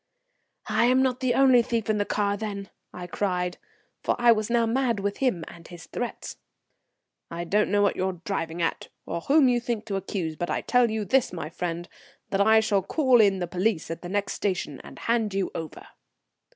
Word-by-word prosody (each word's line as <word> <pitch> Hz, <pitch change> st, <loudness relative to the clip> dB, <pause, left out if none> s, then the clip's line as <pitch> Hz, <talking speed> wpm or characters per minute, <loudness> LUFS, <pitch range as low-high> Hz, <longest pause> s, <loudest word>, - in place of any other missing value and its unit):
"I'm 240 Hz, +4 st, +3 dB
not 255 Hz, -1 st, 0 dB
the 255 Hz, -2 st, +1 dB
only 260 Hz, -3 st, +6 dB
thief 230 Hz, -2 st, -2 dB
in 215 Hz, -1 st, +1 dB
the 205 Hz, -, +1 dB
car, 205 Hz, -1 st, 0 dB
then," 200 Hz, -2 st, -5 dB, 0.2 s
I 180 Hz, -, -7 dB
cried, 180 Hz, -1 st, -2 dB, 0.4 s
for -, -, 0 dB
I 240 Hz, -1 st, +5 dB
was 215 Hz, -1 st, +1 dB
now 235 Hz, -1 st, +3 dB
mad 235 Hz, -1 st, 0 dB
with 200 Hz, +1 st, -2 dB
him 215 Hz, -12 st, 0 dB
and 170 Hz, -1 st, -12 dB
his 175 Hz, -2 st, -11 dB
threats. 245 Hz, -, -5 dB, 0.9 s
"I 170 Hz, +1 st, -4 dB
don't 210 Hz, +5 st, +1 dB
know 205 Hz, +1 st, +3 dB
what 200 Hz, -, +2 dB
you're 185 Hz, -1 st, -2 dB
driving 170 Hz, -4 st, -2 dB
at, 165 Hz, -, -2 dB, 0.2 s
or 170 Hz, -, -4 dB
whom 280 Hz, -, +4 dB
you 245 Hz, -1 st, +3 dB
think 230 Hz, -2 st, -3 dB
to 200 Hz, -3 st, -2 dB
accuse; 185 Hz, -4 st, -3 dB
but 175 Hz, +2 st, -3 dB
I -, -, -1 dB
tell 245 Hz, -2 st, +3 dB
you 215 Hz, -1 st, -2 dB
this, 260 Hz, +6 st, +2 dB
my 165 Hz, -3 st, -6 dB
friend, 175 Hz, 0 st, -4 dB, 0.4 s
that 195 Hz, -, +2 dB
I 220 Hz, +2 st, +6 dB
shall 205 Hz, -3 st, +1 dB
call 255 Hz, -, +3 dB
in 200 Hz, -2 st, +4 dB
the 180 Hz, -, -2 dB
police 180 Hz, 0 st, -1 dB
at 165 Hz, -, -6 dB
the 175 Hz, -, -7 dB
next 205 Hz, +1 st, -1 dB
station 180 Hz, -8 st, -3 dB
and -, -, -12 dB
hand 225 Hz, -4 st, 0 dB
you 195 Hz, -1 st, -1 dB
over." 160 Hz, -2 st, -7 dB
205 Hz, 205 wpm, -26 LUFS, 180-235 Hz, 0.9 s, only